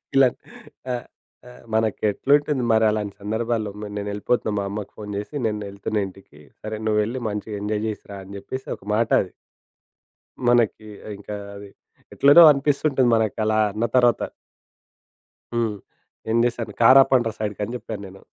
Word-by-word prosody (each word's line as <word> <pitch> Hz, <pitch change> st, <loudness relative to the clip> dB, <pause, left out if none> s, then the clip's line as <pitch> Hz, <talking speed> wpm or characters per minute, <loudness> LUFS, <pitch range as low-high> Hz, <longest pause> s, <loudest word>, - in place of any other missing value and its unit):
ఇలా 135 Hz, -1 st, +7 dB, 0.7 s
ఆహ్, 120 Hz, 0 st, -4 dB, 0.4 s
ఆహ్, 125 Hz, -, -15 dB
మనకెట్లుంటుంది 125 Hz, +6 st, +1 dB
మరలాంటి 110 Hz, -2 st, +2 dB
సందర్భాల్లో? 110 Hz, 0 st, -2 dB, 0.3 s
"నేనేళ్ళిపోతున్నా 105 Hz, +3 st, -1 dB
మా -, -, -1 dB
అమ్మకి 105 Hz, 0 st, -6 dB
ఫోను 105 Hz, -1 st, -7 dB
జేసి, 105 Hz, +8 st, -6 dB, 0.7 s
ఇంటికి 95 Hz, -6 st, -14 dB, 0.2 s
సరే 110 Hz, 0 st, -5 dB
నువ్వెళ్లి 110 Hz, +4 st, 0 dB
మంచిగా 105 Hz, 0 st, -5 dB
ఎంజాయ్ 105 Hz, 0 st, -1 dB
చేసి 110 Hz, -, -5 dB
రా" 100 Hz, -, -7 dB
అని 100 Hz, +1 st, -10 dB
జెప్పేసి 130 Hz, +6 st, -7 dB
ఒక -, -, -22 dB
మాట 115 Hz, +1 st, +1 dB
అది. 90 Hz, -, -7 dB, 1.2 s
మనకి 115 Hz, -3 st, +2 dB, 0.3 s
ఇంకా 105 Hz, +1 st, -7 dB, 0.2 s
అది 100 Hz, 0 st, -10 dB, 0.4 s
ఎట్లనో 145 Hz, +5 st, +8 dB
అనిపిస్తుంటది 140 Hz, -2 st, +1 dB
మనకలా 110 Hz, 0 st, +1 dB
అన్న 110 Hz, +3 st, -1 dB
తరువాత. 120 Hz, -2 st, +4 dB, 1.3 s
హ్మ్. 115 Hz, -3 st, 0 dB, 0.6 s
ఏం 115 Hz, -, +2 dB
జేశాను? 115 Hz, -3 st, -2 dB
"కారు 130 Hz, +4 st, +8 dB
ఆపండ్ర 125 Hz, -4 st, +2 dB
సైడ్‌కి" 105 Hz, -1 st, -4 dB
అని 115 Hz, -, -7 dB
జెప్పాను 110 Hz, -4 st, -6 dB
నేను. 95 Hz, +1 st, -14 dB
110 Hz, 130 wpm, -23 LUFS, 105-120 Hz, 1.3 s, ఎట్లనో